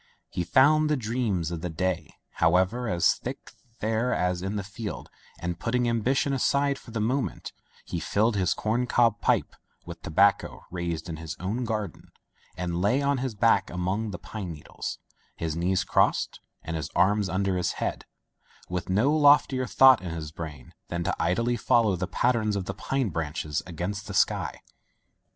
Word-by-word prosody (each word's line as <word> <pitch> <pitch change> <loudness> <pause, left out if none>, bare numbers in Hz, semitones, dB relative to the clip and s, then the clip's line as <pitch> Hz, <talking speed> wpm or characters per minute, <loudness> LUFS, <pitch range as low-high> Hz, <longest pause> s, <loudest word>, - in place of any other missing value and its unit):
He 90 - -2
found 150 - +4
the 150 - +2
dreams 110 -8 -1
of 85 -2 -4
the 90 - -3
day, 90 +2 -2 0.2
however, 95 +8 +2
as 85 -1 +3
thick - - -7 0.3
there 110 +3 0
as 90 0 0
in 95 +3 -3
the 100 - -2
field, 105 +2 -7 0.3
and 85 0 -4
putting 120 +1 0
ambition 125 +4 +1
aside 140 +1 +1
for - - -15
the 115 0 -3
moment, 125 +6 -2 0.3
he 85 - -3
filled 105 +7 +1
his 95 -3 +1
corn 120 +3 0
cob 115 -4 +3
pipe - - +1 0.3
with - - -9
tobacco - - +2
raised 85 -2 -3
in 80 -2 -5
his 80 -1 -6
own 110 +7 -2
garden 105 -3 -4 0.5
and 85 -1 -2
lay 125 +9 +2
on 140 -1 +1
his 130 -3 -3
back 115 +2 +3
among 95 +5 -2
the 95 - -5
pine 95 -2 -6
needles, 75 -2 -6 0.4
his 80 -2 -3
knees 90 +3 +1
crossed - - +1 0.2
and 80 - -4
his 80 -2 -3
arms 100 +2 +3
under 95 0 0
his 90 - 0
head, - - -3 0.6
with 90 0 -4
no 115 +11 +3
loftier 145 -3 +4
thought 130 -4 +7
in 90 - -5
his 80 -2 -5
brain 75 -4 -8
than 85 0 -3
to - - -1
idly 115 +9 +1
follow 110 -3 +3
the 90 +1 -3
pattern 110 0 +1
of 95 - -3
the - - -3
pine 135 -5 -1
branches 75 -2 -2
against 95 +4 -4
the - - -5
sky. - - +1
100 Hz, 175 wpm, -27 LUFS, 85-120 Hz, 0.6 s, thought